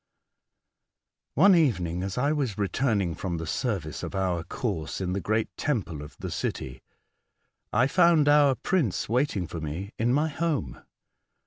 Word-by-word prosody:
One 200 - +7
evening, 90 - +2
as 95 +2 -4
I 140 +4 +2
was 135 -10 -1
returning 100 -3 0
from 85 0 -4
the 80 - -4
service 95 - -2
of - - -5
our 90 -3 0
course 95 -5 -3
in 90 -1 -2
the 100 - -2
great 110 +4 -1
temple 105 - -2
of 75 - -11
the - - -6
city, 65 -1 -4 0.9
I 120 +5 +3
found 165 0 +4
our 145 -2 +5
prince 155 - 0
waiting 120 -5 0
for 85 -1 -6
me 80 +7 -5
in 115 +2 +2
my 150 +4 +2
home. 145 - -2
105 Hz, 150 wpm, -27 LUFS, 90-140 Hz, 0.9 s, One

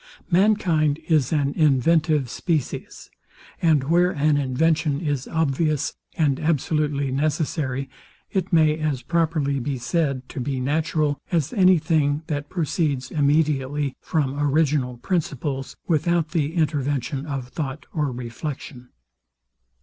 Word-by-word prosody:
Mankind 170 -6 +3
is 155 -6 +2
an 145 -3 +1
inventive 155 0 +3
species; 155 +2 -3 0.5
and 155 -5 +3
where 175 +5 +3
an 150 -3 +2
invention 145 +2 +1
is 145 -5 -2
obvious 155 -1 0 0.2
and 145 -4 +2
absolutely 150 -2 0
necessary, 140 -1 -1 0.4
it 190 0 -1
may 155 -2 +4
as 150 -5 -1
properly 160 -5 0
be 135 +1 -2
said 135 -1 -1
to - - -6
be 130 +1 -2
natural 150 +2 0
as 160 -4 0
any 185 -3 +5
thing 155 -2 +1
that 145 -2 -4
proceeds 155 -6 -1
immediately 145 -2 +1
from 145 -3 -1
original 145 -3 +1
principles, 140 -4 -2
without 170 0 +1
the 155 0 -1
intervention 145 -2 -1
of 135 -4 -4
thought 140 0 -5
or 150 -4 0
reflection. 125 +1 -7
150 Hz, 120 wpm, -23 LUFS, 140-160 Hz, 0.5 s, any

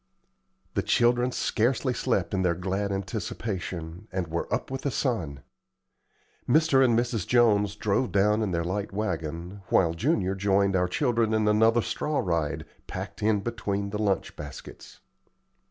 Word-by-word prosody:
The - - +1
children 120 +1 +2
scarcely 125 +3 0
slept 115 -7 -1
in 95 - +1
their 90 -2 +2
glad 95 +3 -2
anticipation, 95 -2 -4
and 95 -1 -1
were 85 +1 -3
up - - -2
with 135 - -3
the 140 - -1
sun. 90 - -2 1.1
Mr. 155 -4 +5
and 120 -3 +4
Mrs. 120 -4 -1
Jones 105 -4 +3
drove 105 +4 0
down 105 +2 +3
in 105 - 0
their 85 -2 -1
light 100 +4 -3
wagon, 90 -2 -4
while 85 -3 +3
Junior 95 - +1
joined 100 0 +2
our 90 -1 +2
children 115 0 +1
in 110 -1 +2
another 110 +2 +4
straw 150 -1 -2
ride, 85 -5 -1 0.2
packed - - -6
in 105 -1 +2
between 100 -3 -3
the 105 +1 -2
lunch 100 -4 0
baskets. 75 -2 -10
100 Hz, 150 wpm, -27 LUFS, 95-115 Hz, 1.1 s, Mr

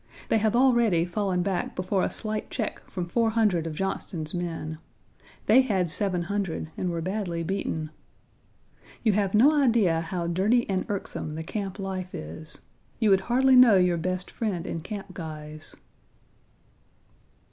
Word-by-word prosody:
They 225 - +3
have 220 +1 +1
already 235 -9 +4
fallen 180 -1 -1
back 190 -2 -2
before 185 +1 0
a - - +1
slight 215 -1 -3
check 220 -5 -3
from 180 -3 -4
400 220 -5 +2
of 155 - -5
Johnston's 165 -3 -3
men. 165 -3 -4 0.7
They 240 +5 +6
had 190 -9 0
700 180 -3 -2
and 180 - -2
were 165 -1 -3
badly 185 -3 -2
beaten. 160 -4 -3 1.1
You 220 -3 +3
have 200 0 +1
no 255 +8 +7
idea 230 - +3
how 170 +1 -3
dirty 200 +8 +2
and 190 -2 -1
irksome 190 -6 -4
the 160 - -4
camp 195 +2 -4
life 190 -2 -5
is. 80 - -9 0.4
You 220 -4 +3
would 190 0 +5
hardly 260 +5 +4
know 250 -4 +8
your 180 -2 +3
best 185 +2 -3
friend 190 -7 -3
in 165 - -4
camp 195 +1 -7
guise." 155 -2 -8
190 Hz, 145 wpm, -26 LUFS, 170-215 Hz, 1.1 s, know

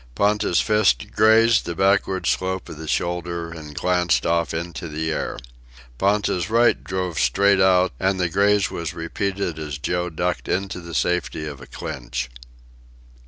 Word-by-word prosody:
Ponta's 105 -1 +2
fist 105 - +2
grazed 110 +1 +4
the 85 - -3
backward 95 0 +1
slope 95 0 -1
of - - -8
the 80 - -7
shoulder, 85 0 -2
and 75 -3 -9
glanced 90 -8 +1
off 85 0 +1
into 85 +2 -5
the 80 +1 -3
air. - - -3 0.6
Ponta's 100 -2 +1
right 120 +2 +3
drove 90 -3 -3
straight 100 +11 +3
out, 95 -1 +4
and 95 0 +1
the 90 - +2
graze 100 +3 +2
was 85 -1 -4
repeated 90 0 -3
as 75 -3 -5
Joe 90 +5 -2
ducked 90 +2 -2
into 95 0 -2
the 85 -2 -8
safety 80 +2 -1
of 70 -3 -7
a 65 - -11
clinch. - - -5
90 Hz, 155 wpm, -22 LUFS, 80-100 Hz, 0.6 s, grazed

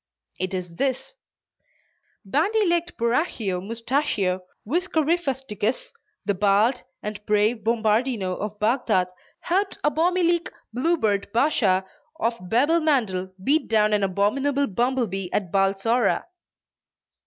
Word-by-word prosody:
It 185 +1 -2
is 175 -2 -6
this: 270 - -1 1.1
"Bandy 385 - +2
legged 345 0 0
Borachio 235 - 0
Mustachio 220 -4 -1 0.3
Whiskerifusticus, 305 - -1 0.3
the 205 - +1
bald 205 +5 +2 0.2
and 210 0 -5
brave 210 +3 +3
Bombardino 220 -3 +1
of 210 +2 -5
Bagdad, 215 -5 +1 0.3
helped 390 +3 0
Abomilique 340 +3 +2 0.2
Bluebeard 235 -8 +1
Bashaw 215 -7 +2 0.4
of 235 -6 +1
Babelmandel 240 - +1
beat 300 +7 +2
down 215 -1 +3
an 210 - +2
abominable 260 +9 +1
bumblebee 230 -5 -1
at 185 -5 -1
Balsora." 195 +5 +2
230 Hz, 95 wpm, -24 LUFS, 200-290 Hz, 1.1 s, brave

